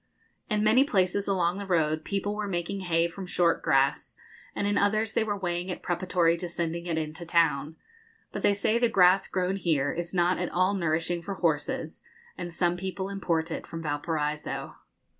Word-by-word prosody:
In 210 -1 +1
many 220 +5 +5
places 200 -6 +1
along 185 -1 +1
the 200 - -5
road 155 -3 +1
people 200 +2 -2
were 210 0 -3
making 180 +1 -2
hay 170 -2 +1
from 185 +2 -8
short 175 -2 +2
grass, 135 0 +1 0.4
and - - -1
in 205 0 +1
others 215 +2 +1
they - - +2
were 205 -2 -2
weighing 175 -1 -2
it 180 - -5
preparatory 175 -1 +1
to 175 0 -5
sending 170 0 -3
it 165 -2 -1
into 160 +1 -4
town. 160 -3 +1 0.6
But - - -5
they 200 - +3
say 215 +3 +1
the 240 -1 +3
grass 190 -2 +5
grown 185 +1 -1
here 150 -7 +1
is 175 0 -4
not 180 0 +2
at 180 - -1
all 185 +3 +2
nourishing 170 -1 0
for 195 +3 -5
horses, 160 -5 -1 0.3
and 175 - -6
some 175 +1 0
people 190 +1 -4
import 170 -4 -1
it - - -5
from 165 0 -6
Valparaiso. 150 0 -2
175 Hz, 185 wpm, -28 LUFS, 165-195 Hz, 0.6 s, many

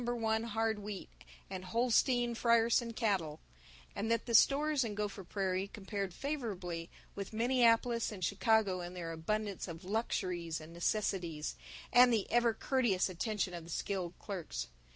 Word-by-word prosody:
1 225 -2 0
Hard 225 -1 0
Wheat 205 -1 -7 0.4
and 190 -1 -6
Holstein 240 +4 +2
Friesian 230 0 +3
cattle; 185 -10 0 0.6
and 210 +3 -2
that 230 -1 +1
the 235 - -3
stores 285 +4 +5
in 215 -3 -3
Gopher 205 -1 -3
Prairie 190 +1 -1
compared 200 -1 -4
favorably 190 - -4 0.2
with 200 +1 -6
Minneapolis 235 0 +3
and 185 -4 -3
Chicago 200 -2 +2
in 175 +1 -7
their 170 -2 -4
abundance 200 +5 -2
of 170 +1 -8
luxuries 180 -6 -1
and 155 +1 -11
necessities 170 -4 -1 0.4
and 245 0 +8
the 220 -4 +2
ever 235 -1 +3
courteous 235 -8 +1
attention 190 0 -2
of 170 -1 -6
the 165 - -12
skilled 180 0 -3
clerks. 165 - -5
210 Hz, 145 wpm, -34 LUFS, 180-230 Hz, 0.6 s, and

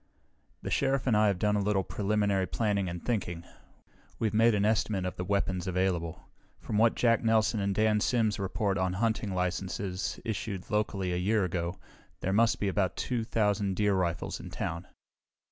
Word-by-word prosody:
"The - - -4
Sheriff 135 -1 +1
and 120 -5 +3
I 105 0 +4
have 100 -3 +1
done 105 +3 +1
a 105 - +1
little 100 -1 +1
preliminary 100 -2 0
planning 100 -4 0
and 85 0 -7
thinking. 90 -8 -2 0.7
We've 110 -3 -1
made 115 +1 +4
an 100 0 +2
estimate 105 -3 +1
of 90 - -5
weapons 95 -2 0
available. 90 -3 -1 0.3
From 105 - -2
what 115 +1 +4
Jack 115 -1 +3
Nelson 110 -1 +2
and 100 -1 0
Dan 110 0 +3
Sims 110 -2 +1
report 100 0 -1
on 95 -1 0
hunting 110 0 0
licenses 90 +1 -2
issued 105 -4 -4
locally 100 -3 0
a - - 0
year 100 +2 +2
ago, 85 0 -3 0.4
there 95 - 0
must 115 +2 +3
be 105 - 0
about 95 -1 0
two 120 -3 -1
thousand 105 -4 0
deer 105 0 +2
rifles 90 -3 -1
in - - -8
town. 85 +2 -4
100 Hz, 175 wpm, -29 LUFS, 95-110 Hz, 0.7 s, I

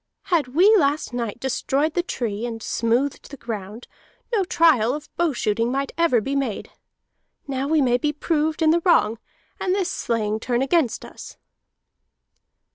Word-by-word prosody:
Had 310 -6 +3
we 400 +6 +6
last 285 -5 0
night 235 -2 -3
destroyed 275 +4 -1
the 350 - +1
tree 230 - -4
and 225 -2 -6
smoothed 240 +5 -1
the 280 - -9
ground, 215 -1 -7 0.5
no 415 -4 +3
trial 295 -9 +3
of 300 0 -10
bow 345 -2 +1
shooting 230 -1 -1
might 275 +1 -2
ever 335 -8 +3
be 270 +6 -3
made. 265 -7 -3 0.8
Now 270 0 -2
we 310 0 +3
may 245 -1 +2
be 295 +3 0
proved 310 +1 -1
in 315 - +5
the 340 +1 +2
wrong, 230 - +3 0.4
and 370 0 0
this 375 -2 -1
slaying 220 - -1
turn 245 +2 0
against 275 -3 +1
us." - - -11
275 Hz, 160 wpm, -23 LUFS, 235-320 Hz, 0.8 s, we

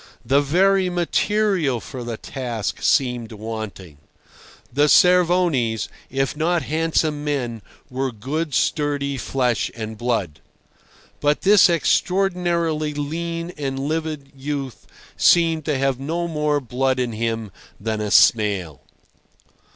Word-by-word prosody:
The 135 +4 +3
very 185 +6 +3
material 180 - +1
for 125 +1 -8
the 120 -2 -5
task 120 -5 -4
seemed 125 -4 +1
wanting. 105 -7 -7 0.7
The 145 +3 +3
Cervonis, 175 - +3 0.2
if 135 +2 -1
not 165 +2 0
handsome 155 -1 0
men, 125 -7 -2 0.3
were 130 +1 -2
good 140 +6 -3
sturdy 145 0 0
flesh 125 -2 0
and 110 -1 -6
blood. 110 -11 -1 0.8
But 145 0 +1
this 200 -2 +6
extraordinarily 170 -3 +1
lean 165 +3 -4
and 135 -2 -3
livid 150 0 -3
youth 135 -5 -5 0.3
seemed 165 -3 +4
to 150 -3 0
have 135 -1 0
no 165 +5 -2
more 150 -2 0
blood 130 0 -1
in 125 -2 -1
him 115 -1 -3 0.3
than 110 0 -2
a 105 - -2
snail. 100 - +3
140 Hz, 115 wpm, -22 LUFS, 120-165 Hz, 0.8 s, this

